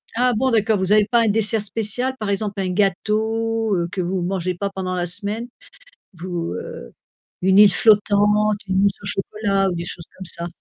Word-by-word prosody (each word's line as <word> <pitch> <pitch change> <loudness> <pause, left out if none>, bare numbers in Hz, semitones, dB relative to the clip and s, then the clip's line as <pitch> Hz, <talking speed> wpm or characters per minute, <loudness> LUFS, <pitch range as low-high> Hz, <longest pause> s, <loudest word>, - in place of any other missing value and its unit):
Ah 250 +1 +2
bon 260 +4 +1
d'accord, 220 -1 +2
vous 190 0 -1
avez 210 -1 +5
pas 235 +2 +2
un - - +1
dessert 215 +1 +1
spécial, 225 +5 -2
par 215 -2 -3
exemple 200 0 -2
un 185 - -2
gâteau, 220 +3 0
heu, 170 -1 -1
que 185 - -2
vous 180 +1 -2
mangez 185 0 -2
pas 200 +3 -3
pendant 190 -2 -4
la 175 -1 -1
semaine? 205 +6 -4 0.7
Vous, 170 -1 -4
heu, - - -8 0.5
une 190 +1 +4
île 205 -2 +8
flottante, 210 -1 +3
une 190 +1 +2
mousse 200 -1 +1
au - - -9
chocolat 195 -1 0
ou - - -3
des 170 0 -4
choses 175 -1 -6
comme 190 - -8
ça? 170 0 -5
200 Hz, 200 wpm, -21 LUFS, 185-220 Hz, 0.7 s, île